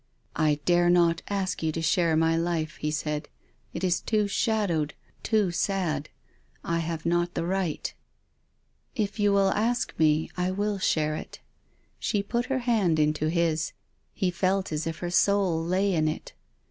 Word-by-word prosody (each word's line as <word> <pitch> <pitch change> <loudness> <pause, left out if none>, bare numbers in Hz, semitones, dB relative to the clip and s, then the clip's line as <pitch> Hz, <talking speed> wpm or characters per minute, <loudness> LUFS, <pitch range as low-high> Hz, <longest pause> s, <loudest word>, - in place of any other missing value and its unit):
" - - -38
I 150 0 +1
dare 175 0 +4
not 170 -2 +4
ask 195 -2 -1
you 160 -1 0
to 165 - -3
share 165 0 +2
my 165 0 +3
life," 165 -1 -1
he 150 - -2
said. 150 -1 -3 0.2
" - - -39
It - - -4
is 180 -2 +2
too 215 -2 +1
shadowed, 195 -9 0 0.3
too 215 -5 +1
sad. 170 -5 -1 0.5
I 170 0 0
have 165 -1 -4
not 175 +1 +1
the - - -1
right." 185 -3 -2 0.5
" - - -45
If 200 +2 -10
you 205 -1 +3
will 195 -1 +3
ask 235 +3 0
me, 155 0 +3
I 180 0 0
will 205 +1 -1
share 155 -4 +1
it." - - -8 0.6
She 205 -3 0
put 235 +3 -1
her 270 - 0
hand 205 -9 +2
into 150 0 +1
his. 165 -2 0 0.4
He 185 -3 -1
felt 185 +1 0
as 155 +1 -2
if 165 - -3
her 175 - -3
soul 185 -3 +2
lay 185 +3 +1
in 155 -2 +2
it. 155 - -4
175 Hz, 175 wpm, -27 LUFS, 160-195 Hz, 0.6 s, dare